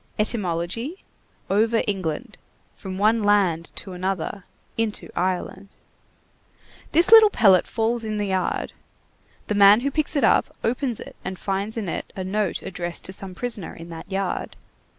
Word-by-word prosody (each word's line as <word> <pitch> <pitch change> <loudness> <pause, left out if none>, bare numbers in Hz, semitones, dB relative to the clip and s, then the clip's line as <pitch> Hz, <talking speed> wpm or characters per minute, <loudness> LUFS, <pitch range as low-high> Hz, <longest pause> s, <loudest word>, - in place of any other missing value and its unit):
Etymology: 215 - -2 0.4
over 225 +3 +2
England; 185 -8 -3 0.3
from 190 -3 -7
one 220 +3 +3
land 195 -6 +2
to 195 - -6
another; 185 +1 -3 0.3
into 225 -2 -2
Ireland. 185 +2 -2 1.2
This 340 +6 +4
little 445 -2 +10
pellet 195 - +4
falls 230 +1 0
in 215 -1 -3
the 205 - -1
yard. 190 -2 -1 0.7
The - - -2
man 205 +2 +7
who 280 +2 -1
picks 305 +1 0
it 285 - +2
up - - +3
opens 245 0 -1
it - - -10
and 190 0 -5
finds 200 +4 -3
in 215 -4 -3
it - - -4
a 190 - -4
note 195 0 -1
addressed 175 -2 -5
to 190 - -5
some 190 -1 -7
prisoner 230 -6 -3
in 165 +1 -10
that 165 +4 -9
yard. 195 -1 -2
200 Hz, 150 wpm, -23 LUFS, 185-225 Hz, 1.2 s, little